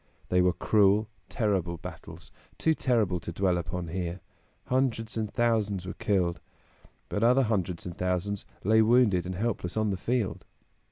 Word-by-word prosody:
They 90 0 +3
were 90 0 +3
cruel, 105 0 +3 0.2
terrible 95 -7 0
battles, - - -10 0.3
too 160 - +2
terrible 110 - +1
to 85 +1 -6
dwell 90 0 +1
upon 85 0 -4
here. 90 +1 -3 0.5
Hundreds 125 -4 0
and 110 -2 -2
thousands 110 -6 0
were 95 - -5
killed; 95 -6 0 0.7
but 105 - -2
other 125 +3 +5
hundreds 95 -7 -1
and 85 -2 -6
thousands 90 +2 -2 0.2
lay 110 +3 +5
wounded 110 -6 +4
and 90 - -4
helpless 105 -3 -2
on 110 -1 +1
the 95 - -2
field. 115 0 -1
100 Hz, 155 wpm, -28 LUFS, 90-115 Hz, 0.7 s, other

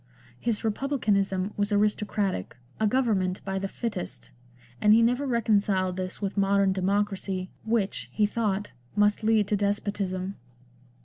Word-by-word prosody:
His 230 - -1
republicanism 205 -5 0
was 205 +1 0
aristocratic, 205 - 0 0.2
a 215 - +3
govern 235 -3 +2
ment 185 0 -3
by 195 0 -1
the 195 - -2
fittest, 205 - -5 0.5
and 210 +1 +6
he 230 - +5
never 250 +4 +2
reconciled 205 -6 +1
this 185 0 -4
with 200 0 -3
modern 195 -1 +3
democracy, 195 -1 -1
which, 200 - -1
he 210 - +2
thought, 210 -2 -1 0.2
must 210 0 +3
lead 215 -2 +3
to 210 - +3
despotism. 200 -2 -2
205 Hz, 135 wpm, -27 LUFS, 190-215 Hz, 0.5 s, and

